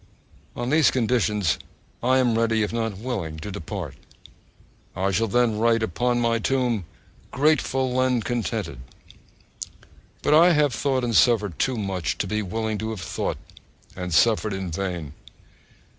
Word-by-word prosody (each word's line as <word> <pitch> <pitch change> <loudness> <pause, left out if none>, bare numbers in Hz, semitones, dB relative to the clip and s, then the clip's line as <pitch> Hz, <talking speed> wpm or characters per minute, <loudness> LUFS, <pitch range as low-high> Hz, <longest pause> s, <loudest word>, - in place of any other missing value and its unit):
On 120 +2 -3
these 155 -1 +5
conditions 110 -7 +1 0.4
I 130 +2 +3
am 125 -3 +2
ready, 115 -1 +2
if 105 - -3
not 115 -4 -2
willing, 100 -9 -4
to 105 - -6
depart. 95 -4 -6 1.0
I 95 +2 0
shall 110 +4 +1
then 115 0 +1
write 115 0 +3 0.2
on 125 0 +2
my 115 -1 +1
tomb 120 -5 0 0.4
GRATEFUL 130 -3 +1
AND 125 -3 +1
CONTENTED! 110 - -3 1.4
But - - +3
I 170 +3 +7
have 150 -4 +2
thought 130 +2 0
and 120 -2 -1
suffered 105 -8 +3
too 130 -2 +1
much 95 -6 -2
to - - -1
be 105 0 -1
willing 110 +2 -3
to 110 - -3
have 110 -4 -5
thought - - -3 0.6
and 90 -1 -5
suffered 110 +3 +3
in 95 -2 -4
vain. 85 -4 -4
115 Hz, 145 wpm, -24 LUFS, 100-125 Hz, 1.4 s, I